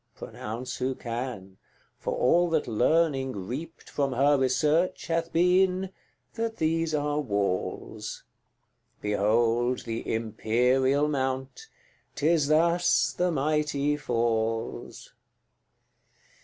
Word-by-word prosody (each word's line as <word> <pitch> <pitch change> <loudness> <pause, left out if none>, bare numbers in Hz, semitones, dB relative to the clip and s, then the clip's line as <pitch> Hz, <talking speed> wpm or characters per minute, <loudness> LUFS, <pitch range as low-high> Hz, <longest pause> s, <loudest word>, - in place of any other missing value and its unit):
Pronounce 120 +4 -6
who 130 +1 -1
can; 115 -6 -6 0.4
for - - -2
all 175 +7 +3
that 160 -2 0
Learning 135 +3 +2
reaped 125 - -7
From 140 -2 -1
her 140 +4 +4
research 150 +7 +1
hath 165 0 -1
been, 185 +2 +2 0.4
that 225 0 -3
these 160 0 0
are 145 0 0
walls 100 -8 -3 0.8
Behold 115 +4 +1
the 115 -1 -4
Imperial 125 +5 +1
Mount! 135 - -3 0.5
'tis 155 -1 +2
thus 170 +3 +3
the 180 0 +1
mighty 150 -1 0
falls. 115 -4 -2
135 Hz, 95 wpm, -27 LUFS, 120-160 Hz, 0.8 s, her